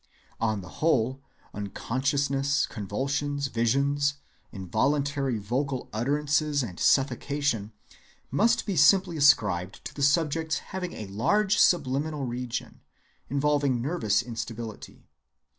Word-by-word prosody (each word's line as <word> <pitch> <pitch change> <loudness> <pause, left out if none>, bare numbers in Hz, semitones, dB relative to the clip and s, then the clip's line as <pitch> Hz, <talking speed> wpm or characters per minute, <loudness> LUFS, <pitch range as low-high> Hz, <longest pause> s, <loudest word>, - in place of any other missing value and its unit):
On 110 -3 0
the 90 - -11
whole, 135 -4 +2 0.3
unconsciousness, 135 +6 0
convulsions, 140 +7 -2
visions, 140 +5 +1 0.4
involuntary 135 - 0
vocal 125 +5 -2
utterances, 145 +4 +1
and 90 -7 -7
suffocation, 135 -4 +1 0.6
must 230 - +2
be 200 - -2
simply 175 +4 +5
ascribed 105 - +2
to - - -6
the 145 - -7
subject's 155 +2 +2 0.2
having 180 -2 -4
a 110 - -6
large 190 - +1
subliminal 145 -2 +2
region, 125 0 -5 0.5
involving 140 -2 +1
nervous 120 - 0
instability. 115 -2 -7
140 Hz, 100 wpm, -27 LUFS, 115-145 Hz, 0.6 s, simply